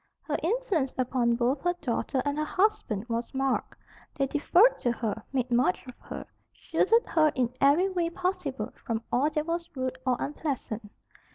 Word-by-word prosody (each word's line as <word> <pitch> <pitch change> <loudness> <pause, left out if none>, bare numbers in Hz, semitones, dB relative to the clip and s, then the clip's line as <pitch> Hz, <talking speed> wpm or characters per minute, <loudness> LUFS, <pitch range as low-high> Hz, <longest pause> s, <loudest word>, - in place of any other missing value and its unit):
Her 300 - -1
influence 350 - 0
upon 250 -2 +2
both 250 +4 +1
her 350 0 +1
daughter 255 0 -1
and 285 +1 0
her - - +1
husband 365 - 0
was 235 0 -2
marked. 270 0 0 0.4
They 275 - +1
deferred 345 - +4
to 240 - +1
her, 220 -2 -3
made 255 -2 -1
much 235 -6 +2
of 250 - -9
her, - - -7 0.3
shielded 460 +1 +2
her 310 -2 +3
in 250 -1 0
every 290 +7 +5
way 350 -3 0
possible 365 +2 -3
from 225 -1 -2
all 275 +5 +3
that 305 -1 -1
was 335 0 -2
rude 260 0 -3
or 255 -2 +1
unpleasant. 255 -8 -4
270 Hz, 170 wpm, -28 LUFS, 245-335 Hz, 0.4 s, every